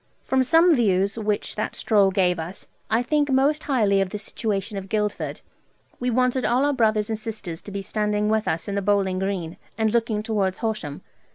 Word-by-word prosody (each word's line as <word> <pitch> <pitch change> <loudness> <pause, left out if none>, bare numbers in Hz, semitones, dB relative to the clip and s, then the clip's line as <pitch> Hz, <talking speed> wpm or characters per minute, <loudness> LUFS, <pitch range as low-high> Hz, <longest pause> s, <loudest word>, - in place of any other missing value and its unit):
From 265 0 +1
some 330 +6 +5
views 200 -4 +2
which 210 -2 -2
that 215 - -2
stroll 205 -3 +3
gave 185 -2 +1
us, 170 +4 -7 0.2
I 225 +2 +2
think 295 +2 +1
most 275 +3 +2
highly 210 -8 +2
of 195 - -1
the 210 - -4
situation 205 0 -3
of 195 -1 -6
Guildford. 210 0 -2 0.6
We 250 - -1
wanted 250 +1 +1
all 250 +4 +2
our 290 - +2
brothers 215 -3 +1
and 220 - -2
sisters 215 -7 -5
to 205 - -10
be 200 0 -4
standing 210 +1 0
with 220 0 +1
us 165 - -1
in 200 - -3
the 200 - 0
bowling 195 -2 +1
green, 185 -4 -3 0.2
and 220 -1 +1
looking 225 -2 0
towards 200 -4 0
Horsham. 210 -11 -4
210 Hz, 195 wpm, -24 LUFS, 195-235 Hz, 0.6 s, some